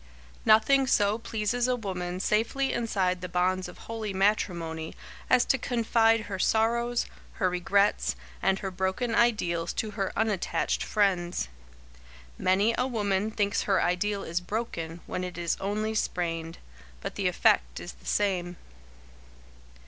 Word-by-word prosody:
Nothing 260 +5 +5
so 205 -2 +3
pleases 230 +2 -1
a 250 - +2
woman 185 -5 -4
safely 225 +7 +1
inside 190 -6 0
the 180 - -5
bonds 185 +1 +1
of 180 - -11
holy 220 -3 -5
matrimony 170 -5 0 0.3
as 255 -1 +5
to 265 - +2
confide 225 -2 +2
her 200 -3 -5
sorrows, 235 +3 +2 0.3
her 185 -4 0
regrets, 200 +3 +2 0.3
and 190 0 +2
her 190 - -2
broken 190 +6 -1
ideals 175 -9 +2
to 215 - -2
her 195 -3 -2
unattached 215 -5 0
friends. 180 - 0 0.9
Many 200 +5 +3
a 250 - +2
woman 205 -4 0
thinks 205 -2 0
her 195 -2 +3
ideal 195 +3 0
is 170 +2 -2
broken 175 -5 -4
when 180 - -3
it 180 -1 -6
is 170 -1 0
only 210 +3 -1
sprained, 165 -5 -2 0.4
but - - -4
the - - 0
effect - - +2
is - - -7
the - - -17
same. 180 -4 0
200 Hz, 140 wpm, -28 LUFS, 180-225 Hz, 0.9 s, Nothing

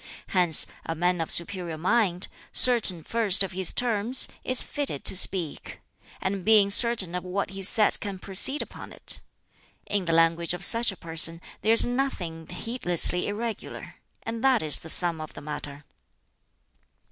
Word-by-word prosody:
Hence, 175 -4 +5 0.2
a 165 - -6
man 175 +1 -2
of 165 - -6
superior 170 -2 0
mind, 185 0 -2 0.2
certain 220 -9 +5
first 210 -3 +2
of 195 - -7
his 185 0 0
terms, 240 +1 0 0.2
is 255 -1 0
fitted 280 - -3
to - - 0
speak; 180 -4 +1 0.4
and 190 0 -5
being 210 -1 +2
certain 220 -5 +3
of 180 - -5
what 190 +1 -5
he 195 0 -9
says 210 +2 +3
can 200 -2 -8
proceed 195 +10 -2
upon - - -14
it. - - -3 0.7
In 200 -3 -4
the 165 - -2
language 165 +1 0
of - - 0
such 230 -1 +4
a 195 - -14
person 165 0 -2 0.2
there 220 +3 +1
is 230 - +6
nothing 195 -11 -5
heedlessly 180 -6 0
irregular 220 +2 -8 0.3
and 225 +1 -7
that 265 -8 +1
is 150 -2 0
the 160 - -11
sum 170 -1 +2
of 155 - -11
the - - -11
matter." 145 -1 -10
190 Hz, 160 wpm, -24 LUFS, 165-225 Hz, 0.7 s, is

